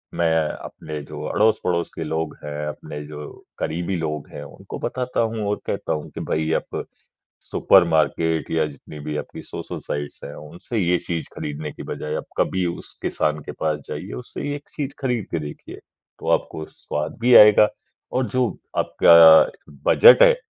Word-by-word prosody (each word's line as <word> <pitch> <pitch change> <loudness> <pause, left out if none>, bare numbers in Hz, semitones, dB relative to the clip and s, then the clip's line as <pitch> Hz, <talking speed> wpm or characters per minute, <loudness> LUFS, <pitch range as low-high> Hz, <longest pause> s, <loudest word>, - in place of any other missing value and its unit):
मैं 85 - +2 0.2
अपने 75 0 -7
जो - - -8
अड़ोस-पड़ोस 90 -5 +1
के 80 - -3
लोग 80 +1 -3
हैं, 75 0 -4
अपने 75 0 -7
जो 75 -1 -8 0.3
क़रीबी 85 +4 -2
लोग 75 -2 -3
हैं, - - -8
उनको 70 - -9
बताता 125 -1 -3
हूँ 115 -1 -1
और 105 - -1
कहता - - -2
हूँ 75 - -5
कि - - -4
भई 80 0 0
आप - - -2 0.7
सुपर - - +5
मार्केट 80 0 +1
या 80 -1 +2
जितनी 75 +1 -11
भी 75 +1 -4
आपकी - - -6
सोशल-साइट्स 75 0 -6
हैं, 70 - -7
उनसे 85 +9 -6
ये 90 -2 +3
चीज़ 85 -2 -3
ख़रीदने 75 +1 -5
की - - -9
बजाय 75 0 -5
आप - - -5
कभी 95 -1 +1
उस 85 - -6
किसान 75 0 0
के - - -3
पास 75 -1 -1
जाइए, - - -6
उससे 60 +1 -7
एक 145 0 -9
चीज़ 140 -2 -3
ख़रीद 125 -5 -1
के 85 - -1
देखिए। 75 -1 -8 0.4
तो - - -5
आपको 80 - -8
स्वाद 75 +1 -5
भी 120 +1 +5
आएगा 105 -1 +9 0.4
और 130 0 +1
जो 130 -2 +2 0.3
आपका 80 -1 +8 0.5
बजट - - +8
है - - +8
80 Hz, 170 wpm, -22 LUFS, 75-105 Hz, 0.7 s, आएगा